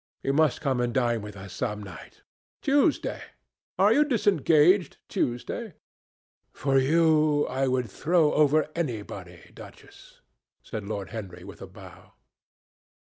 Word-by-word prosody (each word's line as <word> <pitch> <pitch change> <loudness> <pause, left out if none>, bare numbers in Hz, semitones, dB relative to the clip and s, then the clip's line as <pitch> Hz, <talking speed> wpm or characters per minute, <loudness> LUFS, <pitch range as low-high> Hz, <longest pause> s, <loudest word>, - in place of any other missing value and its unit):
You 135 - 0
must 155 -2 +2
come 135 -4 0
and 120 0 0
dine 120 -3 +1
with 105 -1 -9
us 95 0 -10
some 105 -4 -3
night. 95 -5 -12 0.4
Tuesday? 285 +2 +1 0.6
Are 200 +4 +5
you 290 +5 +5
disengaged 185 - +3
Tuesday?" 145 - -3 0.8
"For 135 0 +1
you 155 +1 +3
I 135 +1 -1
would 125 -2 0
throw 160 - +1
over 150 +1 +3
anybody, 105 - -6
Duchess," - - -15 0.4
said 105 -2 -6
Lord 100 -2 -5
Henry 100 -6 -8
with - - -12
a - - -8
bow. - - -15
135 Hz, 130 wpm, -26 LUFS, 110-165 Hz, 0.8 s, Are